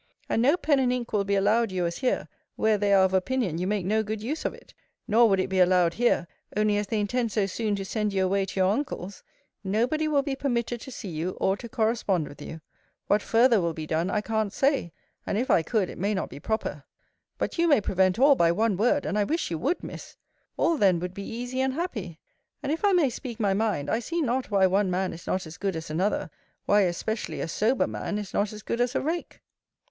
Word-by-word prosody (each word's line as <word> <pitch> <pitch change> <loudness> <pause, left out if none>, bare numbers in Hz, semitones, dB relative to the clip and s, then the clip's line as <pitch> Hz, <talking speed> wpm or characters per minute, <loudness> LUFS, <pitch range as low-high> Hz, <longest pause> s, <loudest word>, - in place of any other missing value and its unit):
And 225 - +1
no 285 +8 +4
pen 290 -6 +2
and 255 -2 +2
ink 245 -2 -3
will 200 -2 +1
be 200 0 +1
allowed 210 +3 +2
you 180 -2 -1
as 170 0 -3
here; 255 - 0 0.3
where 220 0 +2
they 205 0 +1
are 195 -1 +6
of 190 - -1
opinion 190 -3 0
you 180 - -1
make 205 -3 -1
no 215 +3 +2
good 215 0 -4
use 295 +7 -3
of - - 0
it: - - -18 0.3
nor 230 +2 +5
would 195 -1 +3
it 185 - 0
be 190 -1 -1
allowed 180 -2 +4
here, 235 -6 +1 0.3
only 210 -1 +2
as 205 0 -1
they 215 +1 -1
intend 230 +2 -1
so 210 -2 +1
soon 210 +2 -1
to 195 -1 -4
send 210 +1 -1
you 190 -1 +1
away 195 +1 +1
to 195 - -4
your 185 0 +4
uncle's. 205 -6 -4 0.4
No 210 +4 +1
body 310 +4 -1
will 290 -2 +2
be 275 -1 -2
permitted 240 -3 -2
to 265 - -9
see 240 -4 -7
you, 170 +3 -3
or 190 - +2
to 235 +3 -9
correspond 215 -7 0
with 145 - -12
you. 160 - -8 0.4
What 205 +1 +2
farther 230 -1 +4
will 170 -2 -1
be 155 - -5
done, 160 +4 -1
I 210 - 0
can't 220 -1 -1
say; 270 - +1 0.4
and, - - 0
if 250 +4 0
I - - +5
could, 200 +2 0
it - - -9
may 205 +3 0
not 190 - -2
be - - -8
proper. 150 -6 -3 0.5
But - - -3
you 340 - +4
may 290 -7 +5
prevent 190 -2 +1
all, 280 +3 +6
by 170 -10 +3
one 210 +2 +1
word: 245 +8 +2
and 210 - 0
I - - +3
wish 315 - -2
you 165 - -2
would, 345 - -1
Miss. - - -9 0.4
All 335 - +2
then 190 -7 +4
would 180 +1 -4
be 200 - -7
easy 245 +3 -3
and 265 0 0
happy. 215 - -4 0.5
And, 285 - -1
if 320 - -2
I 410 - +5
may 335 -8 +3
speak 235 -1 -7
my 200 -3 +2
mind, 195 -8 0
I 225 - +1
see 335 +8 -3
not 255 0 -1
why 200 -2 +4
one 190 +1 +2
man 185 +1 -1
is 165 - -11
not 185 -1 -1
as 160 0 -10
good 195 -2 -2
as 160 -1 -6
another: 185 +7 -1 0.3
why, 205 0 +4
especially, 220 +6 -4
a - - -2
sober 220 +10 +1
man 210 - -4
is 210 -2 -6
not 205 0 0
as 210 -1 -9
good 235 - -2
as 245 +2 0
a - - +3
rake. 330 +4 -4
210 Hz, 250 wpm, -26 LUFS, 190-245 Hz, 0.5 s, are